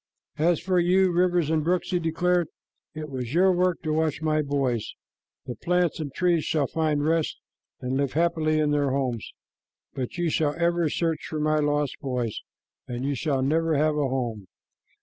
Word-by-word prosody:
"As 170 Hz, +1 st, +3 dB
for 180 Hz, +1 st, +1 dB
you, 185 Hz, +2 st, +3 dB
rivers 175 Hz, -2 st, +2 dB
and 155 Hz, -1 st, +1 dB
brooks," 180 Hz, +4 st, 0 dB
he 180 Hz, -, +2 dB
declared, 175 Hz, +1 st, +1 dB, 0.5 s
"it 155 Hz, 0 st, -5 dB
was 130 Hz, -1 st, -5 dB
your 190 Hz, +2 st, +5 dB
work 180 Hz, -1 st, +1 dB
to 155 Hz, -2 st, -1 dB
watch 155 Hz, -1 st, 0 dB
my 155 Hz, -1 st, +1 dB
boys. 135 Hz, -6 st, -1 dB, 0.5 s
The 125 Hz, -, -4 dB
plants 180 Hz, +5 st, 0 dB
and 150 Hz, -3 st, -4 dB
trees 175 Hz, +1 st, +1 dB
shall 150 Hz, -3 st, +1 dB
find 150 Hz, 0 st, 0 dB
rest 160 Hz, 0 st, +1 dB, 0.4 s
and 130 Hz, +1 st, -1 dB
live 140 Hz, -1 st, 0 dB
happily 160 Hz, -1 st, +1 dB
in 150 Hz, -1 st, +2 dB
their 145 Hz, -1 st, +2 dB
homes, 130 Hz, -4 st, -2 dB, 0.6 s
but 130 Hz, +3 st, -5 dB
you 175 Hz, -2 st, 0 dB
shall 150 Hz, -1 st, +1 dB
ever 170 Hz, -1 st, +1 dB
search 165 Hz, +1 st, -1 dB
for 155 Hz, -, -3 dB
my 155 Hz, 0 st, +2 dB
lost 145 Hz, -1 st, 0 dB
boys, 125 Hz, -5 st, -2 dB, 0.5 s
and 125 Hz, +1 st, -4 dB
you 140 Hz, -, 0 dB
shall 135 Hz, 0 st, -1 dB
never 160 Hz, +3 st, +1 dB
have 155 Hz, +1 st, +2 dB
a 145 Hz, -2 st, +1 dB
home." 120 Hz, -7 st, -3 dB
155 Hz, 180 wpm, -26 LUFS, 140-170 Hz, 0.6 s, your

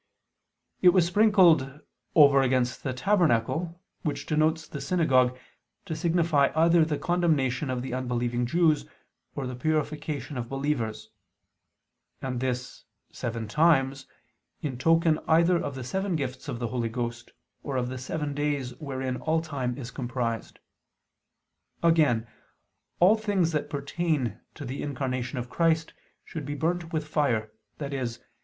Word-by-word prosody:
It 180 Hz, -, +8 dB
was 185 Hz, -3 st, +4 dB
sprinkled 175 Hz, -8 st, +4 dB, 0.4 s
"over 140 Hz, -3 st, +7 dB
against... 125 Hz, -1 st, +1 dB
the 130 Hz, -, -2 dB
tabernacle," 165 Hz, -, +1 dB, 0.2 s
which 150 Hz, -4 st, -3 dB
denotes 155 Hz, +1 st, +1 dB
the 140 Hz, -, -7 dB
synagogue, 130 Hz, -8 st, +2 dB, 0.5 s
to 165 Hz, -5 st, -4 dB
signify 165 Hz, -4 st, +2 dB
either 165 Hz, +1 st, +5 dB
the 155 Hz, -2 st, -1 dB
condemnation 150 Hz, -7 st, +1 dB
of 125 Hz, -1 st, -2 dB
the 130 Hz, -, -5 dB
unbelieving 120 Hz, -1 st, -1 dB
Jews, 160 Hz, +1 st, +2 dB, 0.5 s
or 140 Hz, -, -3 dB
the 125 Hz, -, -4 dB
purification 150 Hz, 0 st, -2 dB
of 120 Hz, -1 st, -5 dB
believers; 135 Hz, -6 st, -2 dB, 1.1 s
and 130 Hz, -2 st, -3 dB
this 125 Hz, -1 st, -4 dB, 0.3 s
"seven 115 Hz, -2 st, -4 dB
times," 135 Hz, -1 st, +2 dB, 0.6 s
in 140 Hz, -4 st, -2 dB
token 165 Hz, +1 st, +3 dB
either 170 Hz, +2 st, +4 dB
of 140 Hz, -2 st, -4 dB
the 130 Hz, -, -5 dB
seven 190 Hz, +7 st, -2 dB
gifts 130 Hz, -4 st, -4 dB
of -, -, -3 dB
the 120 Hz, -1 st, -3 dB
Holy 120 Hz, -2 st, -1 dB
Ghost, 120 Hz, 0 st, -4 dB, 0.3 s
or 140 Hz, -3 st, -3 dB
of 125 Hz, -1 st, 0 dB
the 130 Hz, 0 st, -5 dB
seven 145 Hz, +3 st, -3 dB
days 145 Hz, -3 st, -1 dB
wherein 130 Hz, -3 st, -3 dB
all 160 Hz, +3 st, +1 dB
time 135 Hz, -6 st, -3 dB
is 125 Hz, -3 st, -7 dB
comprised. 120 Hz, -3 st, -3 dB, 1.3 s
Again, 150 Hz, -9 st, +3 dB, 0.7 s
all 185 Hz, +5 st, +6 dB
things 205 Hz, -6 st, 0 dB
that 150 Hz, -2 st, -2 dB
pertain 140 Hz, -, -1 dB, 0.2 s
to 145 Hz, -, -7 dB
the 130 Hz, +3 st, -5 dB
Incarnation 130 Hz, -3 st, -3 dB
of 125 Hz, 0 st, -3 dB
Christ 160 Hz, +3 st, +1 dB, 0.3 s
should 160 Hz, -, -6 dB
be 145 Hz, -, -3 dB
burnt 165 Hz, +2 st, -1 dB
with 155 Hz, -2 st, -2 dB
fire, 120 Hz, -9 st, 0 dB, 0.3 s
i.e. 140 Hz, -3 st, -3 dB
145 Hz, 140 wpm, -27 LUFS, 125-160 Hz, 1.3 s, It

